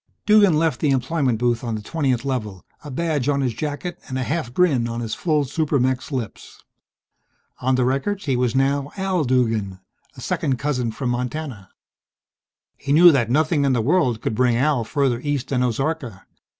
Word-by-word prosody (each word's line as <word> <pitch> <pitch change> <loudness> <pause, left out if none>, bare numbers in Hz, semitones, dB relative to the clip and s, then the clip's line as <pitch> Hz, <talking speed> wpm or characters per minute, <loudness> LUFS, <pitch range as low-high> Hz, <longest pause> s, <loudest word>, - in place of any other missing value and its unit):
Duggan 205 -6 +5
left 160 0 +1
the 150 - +2
employment 135 -1 0
booth 120 0 0
on 115 -2 -2
the 105 - -5
20th 130 0 -1
Level, 105 -9 -4 0.2
a 150 - -8
badge 145 -1 -1
on 140 -1 +1
his 125 -3 0
jacket 150 +7 -5
and 130 - -4
a 130 - -1
half 150 -2 -3
grin 135 -6 +2
on 115 0 -4
his 115 -2 -4
full 150 -4 0
super 150 +1 0
mech's 130 +3 -1
lips. 125 -6 -6 1.0
On 130 +1 +1
the 125 -1 +1
records 165 +11 -1
he 135 -4 +1
was 125 -1 0
now 140 +1 +1
Al 190 -3 0
Duggan, 115 -7 0 0.4
a - - -9
second 130 -2 -1
cousin 125 -4 -1
from 125 +2 -3
Montana. 125 -4 -4 1.1
He 140 - -4
knew 170 +4 +8
that 125 -6 +1
nothing 155 +3 +2
in 135 -2 +2
the 125 - +1
world 130 -4 +1
could - - -2
bring 125 +1 +2
Al 135 -1 +1
further 135 -1 0
east 140 -1 -3
than 130 -2 0
Ozarka. 125 -4 -2
130 Hz, 185 wpm, -22 LUFS, 120-150 Hz, 1.1 s, knew